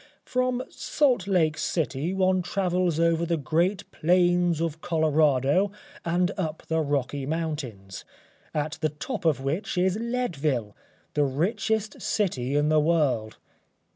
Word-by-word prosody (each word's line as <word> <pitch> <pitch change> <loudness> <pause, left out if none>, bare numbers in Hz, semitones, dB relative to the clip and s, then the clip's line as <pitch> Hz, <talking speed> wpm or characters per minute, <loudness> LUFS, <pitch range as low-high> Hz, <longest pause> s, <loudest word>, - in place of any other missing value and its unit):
From 255 0 0
Salt 250 - +1
Lake 160 -5 +2
City 155 0 -1
one 185 -1 +2
travels 180 -2 0
over 165 0 +3
the 170 0 0
great 170 +6 0
plains 175 0 +2
of 165 -1 -2
Colorado 155 +2 +2 0.3
and 175 +2 +1
up 160 -3 -3
the 160 0 +1
Rocky 140 -2 -1
Mountains, 140 - -4 0.5
on 150 0 0
the 155 -1 +1
top 175 - -6
of 150 -5 +2
which 155 +8 -2
is 185 +3 +2
Leadville, 155 - -1 0.4
the 150 - +2
richest 210 - -1
city 140 - -1
in 145 +1 +2
the 155 0 +4
world. 150 -9 +1
165 Hz, 130 wpm, -26 LUFS, 145-185 Hz, 0.5 s, the